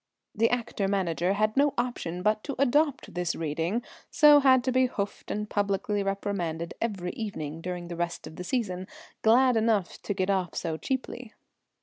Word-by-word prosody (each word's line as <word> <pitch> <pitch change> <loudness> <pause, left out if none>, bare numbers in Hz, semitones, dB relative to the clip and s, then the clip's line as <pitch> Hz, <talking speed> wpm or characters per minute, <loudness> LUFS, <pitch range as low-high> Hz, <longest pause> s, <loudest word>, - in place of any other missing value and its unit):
The 230 +1 +2
actor 230 -5 -1
manager 185 -2 0
had 215 +1 +1
no 285 +1 +3
option 180 -8 -2
but 215 +1 +2
to 280 - -4
adopt 280 +1 +1
this 175 -1 -1
reading, 165 +8 -2 0.3
so 295 -1 +7
had 260 -3 +5
to 260 - 0
be 255 0 +3
hoofed 200 -4 -5
and 210 0 -2
publicly 205 0 0
reprimanded 195 -4 -2
every 195 -6 -2
evening 165 -8 -5
during 175 0 -5
the 170 - -6
rest 170 0 -3
of 160 - -10
the 180 - -6
season, 185 -4 -2 0.3
glad 245 +3 +5
enough 220 -5 +1
to 205 - -3
get 185 +1 +1
off 185 -3 -1
so 165 -2 -2
cheaply. 250 +3 -4
205 Hz, 175 wpm, -28 LUFS, 180-240 Hz, 0.3 s, so